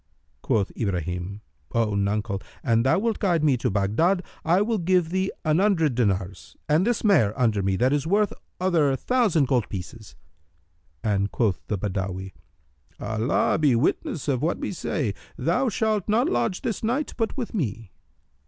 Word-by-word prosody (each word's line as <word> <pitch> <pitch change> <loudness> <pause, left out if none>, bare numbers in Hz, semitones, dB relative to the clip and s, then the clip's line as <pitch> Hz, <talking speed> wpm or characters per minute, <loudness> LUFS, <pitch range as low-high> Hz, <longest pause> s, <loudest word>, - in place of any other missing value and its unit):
Quoth 110 -6 0
Ibrahim, 90 0 -3 0.3
"O 115 -2 +1
nuncle, 100 0 -1 0.2
an 115 -1 +3
thou 130 +7 +3
wilt 225 +2 0
guide 175 -6 +1
me 145 -4 +4
to - - -1
Baghdad, 110 - +1 0.2
I 175 +5 +3
will 220 0 0
give 180 -1 +2
thee 190 +1 0
an 155 +2 +3
hundred 180 -8 +2
dinars 100 -5 -2
and 160 +7 +3
this 240 -2 0
mare 135 - +3
under 110 -5 +2
me 95 0 0
that 125 +7 +2
is 145 +1 0
worth 205 +3 +2 0.3
other 165 -7 +2
thousand 200 - +2
gold 125 -5 +1
pieces;" 100 +3 -8 0.9
and 100 -1 0
quoth 105 -6 0
the 105 - -1
Badawi, 95 -1 -3 0.7
"Allah 110 +5 0
be 145 -6 +4
witness 145 +4 -1
of 130 -3 0
what 165 +3 0
we - - -4
say! 145 - -2 0.2
Thou 180 - +1
shalt 215 -3 0
not 225 +4 +3
lodge 120 +9 -1
this 225 -4 -3
night 255 +7 -1
but 225 +2 -2
with 245 -4 -4
me." 115 - -3
135 Hz, 160 wpm, -25 LUFS, -, 0.9 s, me